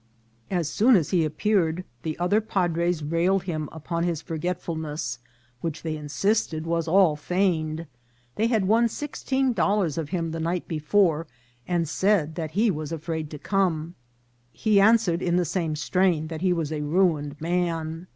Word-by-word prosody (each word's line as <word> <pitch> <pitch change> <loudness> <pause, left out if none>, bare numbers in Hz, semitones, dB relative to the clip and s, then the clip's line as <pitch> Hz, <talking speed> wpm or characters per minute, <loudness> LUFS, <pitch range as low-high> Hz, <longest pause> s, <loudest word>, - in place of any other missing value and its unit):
As 175 -5 0
soon 225 +10 +4
as 170 -7 +1
he 175 -4 +3
appeared 170 +1 +1 0.2
the 155 +2 -4
other 190 +5 +2
padres 175 -5 0
rallied 170 +5 +1
him 155 -5 -3
upon 170 +2 -3
his 170 -3 0
forgetfulness, 160 -5 -4 0.4
which 165 +2 -4
they 160 -1 -2
insisted 155 - -1
was 165 0 -1
all 180 -2 +4
feign 160 -1 0
ed; 165 - -11 0.5
they 225 - +2
had 220 -5 +1
won 230 +3 +4
sixteen 265 0 -1
dollars 195 -5 +1
of 155 -3 -4
him 170 -3 -2
the 165 - -4
night 170 +2 -2
be 160 - -3
fore, 165 -1 +2 0.4
and 175 -2 0
said 180 -2 +1
that 160 -1 -4
he 220 0 +4
was 155 -2 -5
afraid 160 -1 -4
to 150 - -7
come. 170 -2 0 0.6
He 210 - +3
answer 220 -3 +5
ed 170 - -2
in 175 -1 +1
the 180 0 +2
same 165 -1 -1
strain 165 0 +1
that 160 -1 -6
he 185 -1 +2
was 165 -4 -1
a 155 -1 -2
ruined 150 -2 +1
man. 165 0 -2
170 Hz, 170 wpm, -25 LUFS, 155-190 Hz, 0.6 s, answer